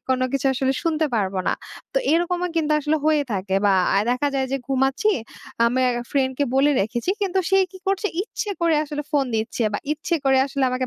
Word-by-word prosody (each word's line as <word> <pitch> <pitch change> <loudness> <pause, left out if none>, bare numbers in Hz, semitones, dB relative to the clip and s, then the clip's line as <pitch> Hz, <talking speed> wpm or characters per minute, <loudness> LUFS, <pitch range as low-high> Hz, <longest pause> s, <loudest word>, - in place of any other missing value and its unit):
কোনো 255 0 +2
কিছু 275 0 0
আসলে 265 +1 0
শুনতে 320 -1 +1
পারব 200 -3 0
না। - - +3 0.4
তো - - +4
এরকমও 350 +2 +1
কিন্তু 305 -2 +1
আসলে 300 +2 +1
হয়ে 305 -2 +3
থাকে 190 -1 -2
বা 200 - +4 0.2
আ - - +5
দেখা 250 +4 +1
যায় 265 -1 0
যে - - +2
ঘুমাচ্ছি, 270 +9 +1 0.6
আমায় 255 +1 +2 0.2
ফ্রেন্ডকে 270 0 +1
বলে 275 +2 +4
রেখেছি। 235 - -1
কিন্তু 385 -1 0
সে 385 - +5 0.2
কি 375 - -11
করছে? 390 +2 +1 0.2
ইচ্ছে 425 -1 -5
করে 335 -2 +3
আসলে 295 0 -4
ফোন 285 -3 +2
দিচ্ছে 220 +2 -1
বা - - -1
ইচ্ছে 315 +3 -2
করে 265 -1 +4
আসলে 275 0 -3
আমাকে 255 0 -1
275 Hz, 200 wpm, -22 LUFS, 255-320 Hz, 0.6 s, আ